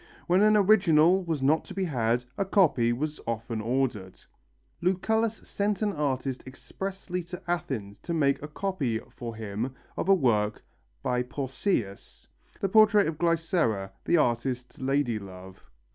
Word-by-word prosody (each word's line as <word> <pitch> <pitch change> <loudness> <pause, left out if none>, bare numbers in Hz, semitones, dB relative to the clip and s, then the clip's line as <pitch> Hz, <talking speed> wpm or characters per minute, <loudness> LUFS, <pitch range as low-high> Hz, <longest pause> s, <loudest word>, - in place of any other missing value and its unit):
When 180 +3 +3
an 215 0 +5
original 190 -3 +5
was 160 -5 -2
not 155 +4 +3
to - - -10
be 195 -1 0
had, 120 -5 0
a - - 0
copy 155 - +3
was 150 +5 -3
often 115 -1 -3
ordered. 115 -5 -2 0.6
Lucullus 220 +5 0
sent 205 0 -1
an 205 -1 0
artist 135 -3 -2
expressly 185 +6 -5
to 180 0 -7
Athens 135 -13 -3
to - - -7
make 140 -4 +2
a 150 - -5
copy 150 - -2 0.2
for 115 -2 -6
him 110 +4 -4 0.2
of 190 - -2
a 195 - +8
work 110 - +1 0.4
by 125 0 +1
Pausias, 130 - -3 0.3
the 195 - +1
portrait 210 0 +5
of 160 -1 -4
Glycera, 165 - +1
the 175 - +3
artist's 125 -2 -1
lady 130 -4 +1
love. 95 -1 -11
140 Hz, 145 wpm, -27 LUFS, 120-185 Hz, 0.6 s, a